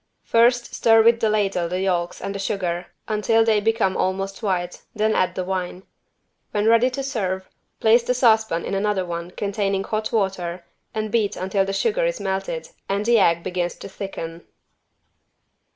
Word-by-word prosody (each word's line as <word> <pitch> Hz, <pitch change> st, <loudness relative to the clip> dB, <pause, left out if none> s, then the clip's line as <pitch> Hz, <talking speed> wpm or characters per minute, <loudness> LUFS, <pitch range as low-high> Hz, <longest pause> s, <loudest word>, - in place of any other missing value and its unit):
First 240 Hz, +1 st, +3 dB
stir 225 Hz, -1 st, +5 dB
with 230 Hz, 0 st, +5 dB
the 220 Hz, -, +2 dB
ladle 195 Hz, -5 st, 0 dB
the 180 Hz, +1 st, -2 dB
yolks 175 Hz, -2 st, -1 dB
and 195 Hz, -, -4 dB
the 200 Hz, -, -5 dB
sugar 180 Hz, -3 st, -2 dB, 0.2 s
until 225 Hz, +1 st, +2 dB
they 220 Hz, -2 st, +3 dB
become 220 Hz, -3 st, +1 dB
almost 195 Hz, +2 st, -2 dB
white, 180 Hz, -4 st, -2 dB
then 215 Hz, 0 st, +2 dB
add 185 Hz, -, +1 dB
the 185 Hz, -, -2 dB
wine. 185 Hz, 0 st, -4 dB, 0.7 s
When 210 Hz, 0 st, -1 dB
ready 230 Hz, +3 st, +5 dB
to 270 Hz, +2 st, -4 dB
serve, 190 Hz, -8 st, -2 dB, 0.3 s
place 225 Hz, +2 st, +5 dB
the 250 Hz, +2 st, -1 dB
saucepan 220 Hz, -8 st, +3 dB
in -, -, -4 dB
another 195 Hz, -1 st, 0 dB
one 170 Hz, 0 st, -5 dB
containing 200 Hz, 0 st, -1 dB
hot 215 Hz, +1 st, -2 dB
water 185 Hz, -5 st, -1 dB, 0.3 s
and 215 Hz, -1 st, -2 dB
beat 215 Hz, -3 st, +1 dB
until 190 Hz, +1 st, 0 dB
the 195 Hz, -, -3 dB
sugar 460 Hz, -, +1 dB
is -, -, 0 dB
melted 485 Hz, -, -3 dB, 0.2 s
and 200 Hz, +1 st, 0 dB
the 235 Hz, -1 st, +5 dB
egg 170 Hz, -3 st, +3 dB
begins 180 Hz, -1 st, -2 dB
to -, -, -9 dB
thicken. 170 Hz, -4 st, -7 dB
200 Hz, 170 wpm, -22 LUFS, 185-225 Hz, 0.7 s, stir